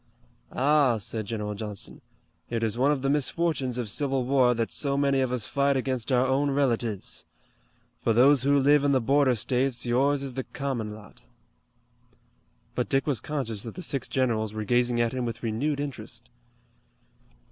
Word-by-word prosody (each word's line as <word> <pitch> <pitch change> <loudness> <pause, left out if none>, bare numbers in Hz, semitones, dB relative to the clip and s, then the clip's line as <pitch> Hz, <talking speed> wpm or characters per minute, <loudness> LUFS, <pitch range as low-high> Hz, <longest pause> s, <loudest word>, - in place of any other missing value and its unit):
"Ah," 140 -3 +3
said 110 +1 -4
General 105 -1 -3
Johnston, 105 -1 -7 0.5
"it 115 -1 -2
is 110 -1 0
one 135 +4 +3
of 140 -3 -1
the - - +1
misfortunes 145 -3 0
of 120 -3 -2
civil 135 +3 -1
war 130 -2 +3
that 115 -1 -2
so 140 -1 0
many 140 -1 +2
of 130 -1 0
us 125 -4 -2
fight 140 0 +1
against 130 -1 -2
our 125 0 +3
own 135 +2 +1
relatives. 120 -7 -1 0.7
For - - +1
those 130 +4 +5
who 140 +1 +3
live 145 +1 +4
in 140 -1 +3
the 130 - +4
border 135 +1 +3
states 125 +2 -1
yours 135 +4 +2
is 135 -2 -5
the 130 +1 -3
common 120 -7 -4
lot." 105 -2 -15 1.5
But - - -2
Dick 135 0 +1
was 140 -6 0
conscious 130 -9 -4
that 115 -1 -8
the 185 - -6
six 140 -4 -3
generals 110 -5 -1
were 110 - -3
gazing 120 +1 +2
at 115 0 +1
him 130 -1 -2
with 115 0 -5
renewed 135 +7 -1
interest. 120 -4 -7
130 Hz, 175 wpm, -27 LUFS, 115-140 Hz, 1.5 s, those